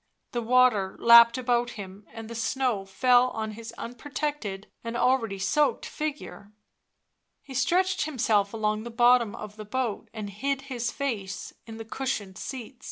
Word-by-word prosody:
The 240 - -2
water 235 -5 +3
lapped 235 0 +8
about 245 -1 0
him, 200 +1 -9
and 225 -1 -8
the 230 - -7
snow 230 -2 -1
fell 250 +5 +4
on 220 -2 -4
his 225 +1 -8
unprotected 245 -5 -4 0.2
and 230 0 -4
already 240 -6 +1
soaked 275 +10 +1
figure; 295 -9 -6 0.9
he 275 - -11
stretched 365 +9 +1
himself 220 -8 +1
along 215 -1 -1
the 235 - -7
bottom 240 -1 +4
of 210 -1 -9
the 215 - -6
boat 235 0 -3
and 215 -3 -6
hid 270 +6 -2
his 240 -1 -1
face 220 -9 -4
in 225 0 -8
the 225 - -7
cushioned 215 -5 -4
seat. 255 -1 -7
235 Hz, 155 wpm, -27 LUFS, 215-255 Hz, 0.9 s, lapped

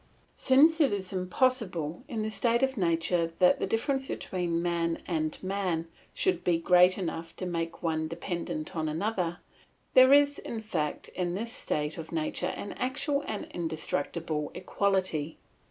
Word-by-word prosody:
Since 310 +5 +5
it 285 - +4
is 195 -2 -3
impossible 185 - 0
in 230 -7 -3
the 220 - -2
state 235 +2 +1
of 265 0 +1
nature 170 -3 +1
that 180 0 +5
the - - -1
difference 265 +6 0
between 175 -2 -2
man 170 -1 -1
and 155 -3 -1
man 185 -4 -1 0.3
should 375 - 0
be 175 -2 +3
great 180 +2 +5
enough 165 -3 -4
to 185 - -5
make 170 0 -3
one 160 -1 0
dependent 170 0 -4
on 155 -1 -1
another, 175 +1 -1 0.6
there 260 +1 +8
is 285 0 +5
in 230 - -5
fact 170 -9 -3
in 175 -1 -2
this 230 +4 -4
state 150 +2 -2
of 165 0 -8
nature 165 +2 -1
an 200 - -5
actual 280 +3 0
and 215 - -3
indestructible 160 -2 -2
equality. 185 -6 0
180 Hz, 155 wpm, -29 LUFS, 165-225 Hz, 0.6 s, there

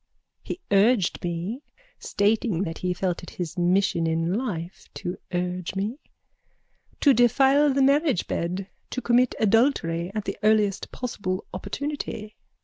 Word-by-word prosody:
He 350 - -6
urged 205 0 +3
me 175 +9 -3 0.4
(Stating 205 -3 +1
that 165 -3 -5
he 180 - -1
felt 180 -1 -1
it 175 - -9
his 170 -2 -5
mission 175 -1 +2
in 165 +2 0
life 190 -7 -4
to 180 +1 -5
urge 180 0 -2
me.) 210 +8 -2 1.0
to 280 - +6
defile 270 +5 +4
the 270 0 +2
marriage 280 - +3
bed, 180 +3 -3 0.2
to - - -3
commit 245 0 +2
adultery 195 -6 +2
at 215 - -2
the 195 - -4
earliest 210 -2 +2
possible 200 -7 -4
opportunity. 225 0 -5
200 Hz, 135 wpm, -25 LUFS, 180-245 Hz, 1.0 s, to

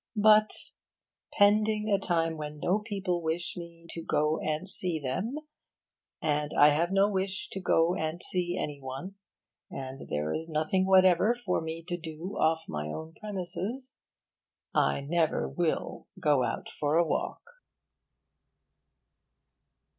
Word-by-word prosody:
But, 215 0 +6 0.8
pending 210 +1 +3
a 200 - +4
time 165 -3 0
when 150 -1 -6
no 185 +7 +2
people 195 -5 -2
wish 165 +2 -2
me 170 -1 -10
to 165 - -5
go 155 0 +1
and 155 +4 -2
see 180 -3 0
them, 185 - -2 0.8
and 150 -1 -1
I 145 - +8
have 165 +4 +1
no 195 +1 +4
wish 195 0 -2
to 195 - -5
go 170 -2 +3
and 160 -1 -2
see 180 0 0
any 145 -5 -4
one, 135 +9 -6 0.6
and 135 0 -7
there 75 +1 -1
is 165 +1 -4
nothing 160 +5 +1
whatever 190 +4 +5
for 205 -9 -1
me 160 +1 -5
to 175 -1 -2
do 165 +3 -7
off 160 0 +2
my 75 0 -4
own 160 - -6
premises, 210 +7 -5 0.7
I - - +2
never 160 +2 +1
will 170 -3 -2
go 145 -4 +3
out - - -3
for 150 +1 -1
a 170 - +4
walk. - - -2
170 Hz, 140 wpm, -29 LUFS, 155-195 Hz, 0.8 s, I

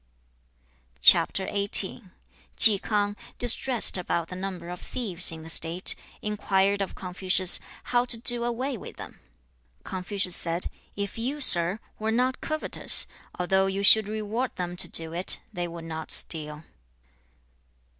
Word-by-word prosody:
Chi - - +8
K'ang, 200 +1 +1 0.2
distressed 245 -3 +2
about 170 -2 -4
the 180 - -8
number 185 -2 -7
of 180 - -9
thieves 185 -9 0
in 160 -1 -10
the 160 - -11
state, 170 +3 +1 0.3
inquired 200 -1 -1
of 195 - -5
Confucius 185 0 +1 0.2
how 245 0 0
to 240 - +3
do 240 +1 0
away 250 +3 -4
with - - -11
them. - - -12 0.6
Confucius 185 -1 -2
said, 170 +1 -2 0.2
'If 200 +2 -6
you, 265 +6 -3
sir, 180 -6 +6 0.2
were 220 +1 -3
not 255 +3 -1
covetous, 310 0 -1 0.3
although 190 +2 0
you 195 +1 -3
should 215 0 +6
reward 220 +4 -4
them 180 -1 -6
to - - +7
do 165 0 +1
it, 180 +2 0
they 175 0 -4
would 170 -1 -10
not 160 -1 -8
steal.' 150 -1 -1
195 Hz, 135 wpm, -25 LUFS, 175-220 Hz, 0.6 s, Chi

